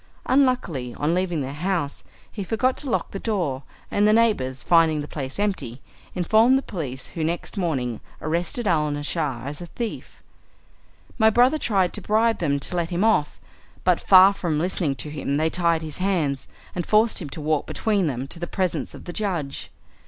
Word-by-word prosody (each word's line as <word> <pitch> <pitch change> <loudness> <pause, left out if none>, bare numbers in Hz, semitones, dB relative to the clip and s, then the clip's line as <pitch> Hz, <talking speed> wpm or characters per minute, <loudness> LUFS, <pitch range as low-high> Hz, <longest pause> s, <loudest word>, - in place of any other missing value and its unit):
Unluckily, 250 - +1
on 150 +3 0
leaving 175 -3 0
the 135 +1 -4
house, 165 -2 -2 0.3
he 205 - -5
forgot 255 +7 +1
to 285 - -6
lock - - -1
the 195 - -5
door, 175 - -1 0.3
and 205 +1 +3
the 215 - +5
neighbours, 170 - +2
finding 165 -3 +4
the 145 - -6
place 135 -3 -5
empty, 195 - -2 0.4
informed 220 +8 +4
the 270 - -2
police, 135 - -5
who 165 - -4
next 170 +6 -3
morning 135 - -1 0.2
arrested 170 +9 -2
Alnaschar 150 -5 0
as 145 +3 -6
a 175 - -7
thief. 230 +4 -6 1.0
My 220 0 +6
brother 250 +7 +4
tried 195 -8 +1
to 210 - -5
bribe 220 +4 +2
them 140 -4 +1
to 180 - -5
let 170 -1 -1
him 175 +2 0
off, 220 -10 +2 0.4
but 180 -2 +3
far 190 +1 +7
from 170 -6 -2
listening 165 -3 0
to 150 +3 -3
him 140 -1 -2
they 160 +1 +1
tied 170 -2 +1
his 155 +1 -7
hands, 165 -8 0 0.3
and 175 - -2
forced 215 +4 +3
him 155 - -5
to 150 - -8
walk 155 -1 0
between 205 -6 0
them 130 -1 -3
to 170 - -5
the 175 - -4
presence 185 -1 -2
of - - -11
the 175 - -6
judge. 175 -10 -3
175 Hz, 185 wpm, -24 LUFS, 145-205 Hz, 1.0 s, far